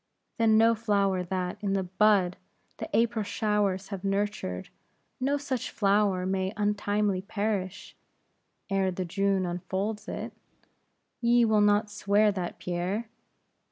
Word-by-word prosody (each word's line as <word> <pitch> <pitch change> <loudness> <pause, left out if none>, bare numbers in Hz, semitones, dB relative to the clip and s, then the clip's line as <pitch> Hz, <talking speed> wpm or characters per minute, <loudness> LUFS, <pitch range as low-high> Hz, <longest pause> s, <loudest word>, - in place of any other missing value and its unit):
"Then 220 -1 +5
no 225 +1 +5
flower 200 -4 +1
that, 180 +1 -3
in 200 -2 0
the 195 -1 +1
bud, 190 -1 +2 0.4
the - - -6
April 230 -1 +2
showers 205 -2 0
have 195 -2 -6
nurtured; 195 - -2 0.5
no 275 +3 +1
such 275 -4 -3
flower 200 -2 +2
may 190 +1 -1
untimely 205 -2 0
perish, 200 -2 -3 0.7
ere 195 -2 +1
the 185 0 -3
June 195 +1 +1
unfolds 190 +4 -3
it? - - -5 0.9
Ye 235 0 +4
will 215 -2 +3
not 205 +1 +3
swear 205 +1 +3
that, 185 -3 -4
Pierre?" 185 +6 -3
200 Hz, 125 wpm, -28 LUFS, 190-215 Hz, 0.9 s, Then